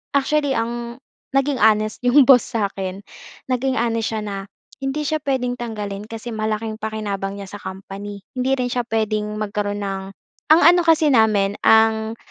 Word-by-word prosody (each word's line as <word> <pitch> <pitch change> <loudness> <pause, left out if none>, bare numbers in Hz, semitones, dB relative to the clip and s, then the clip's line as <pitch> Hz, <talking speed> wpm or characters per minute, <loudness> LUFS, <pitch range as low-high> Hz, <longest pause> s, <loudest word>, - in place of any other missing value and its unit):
actually 285 0 +2
ang 235 +1 -3 0.4
naging 275 -1 0
honest 215 0 +3
'yong 260 +2 +6
boss 260 -3 +7
sa'kin, 195 -4 -3 0.5
naging 260 +1 0
honest 230 -1 0
siya 220 - -2
na 200 -1 -4 0.5
hindi 270 +3 -2
siya 310 +1 -1
puwedeng 255 -3 0
tanggalin 210 -4 -5
kasi 225 +1 -7
malaking 220 0 -2
pakinabang 205 -3 -4
niya 200 - -6
sa 205 - -8
company. 195 +1 -8
Hindi 255 +1 +1
rin 250 - 0
siya 245 - 0
puwedeng 215 -2 -1
magkaroon 205 -1 -2
ng 195 -1 -3 0.5
ang 320 +2 +7
ano 350 +1 +7
kasi 320 -2 +4
namin 210 -4 +3
ang 220 0 +4
220 Hz, 155 wpm, -21 LUFS, 205-250 Hz, 0.5 s, boss